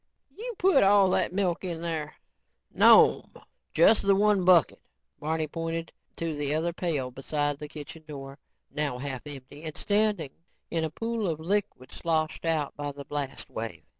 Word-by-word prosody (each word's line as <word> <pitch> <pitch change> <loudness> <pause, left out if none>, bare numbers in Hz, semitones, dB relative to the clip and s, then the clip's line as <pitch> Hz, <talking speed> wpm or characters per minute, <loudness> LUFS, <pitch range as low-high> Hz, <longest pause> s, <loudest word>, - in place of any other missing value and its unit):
"You 475 +2 -6
put 370 -6 +4
all 195 -1 +5
that - - +2
milk 185 -2 0
in 170 -3 -4
there?" 155 -3 -3 0.6
"No'm, - - +6 0.4
just 190 +7 +5
the 195 0 +3
one 205 -1 +3
bucket." 180 -2 +4 0.4
Barney 160 +1 -1
pointed 165 +1 -4 0.2
to 165 -2 -3
the 145 0 -1
other 170 +2 -1
pail 155 -8 -2
beside 145 +2 -2
the 150 - -6
kitchen 155 +1 -10
door, 135 -1 -9 0.3
now 145 -3 -2
half 135 +1 -6
empty 145 +1 -10
and 155 -2 -6
standing 205 -8 +1 0.4
in 165 -1 0
a 160 - -1
pool 225 +5 -3
of 160 -2 -2
liquid 190 -6 -2
sloshed 160 -1 -1
out 155 -3 0
by 145 0 -4
the 140 0 -10
blast 145 -2 -5
wave. 115 0 -6
160 Hz, 165 wpm, -27 LUFS, 145-185 Hz, 0.6 s, No'm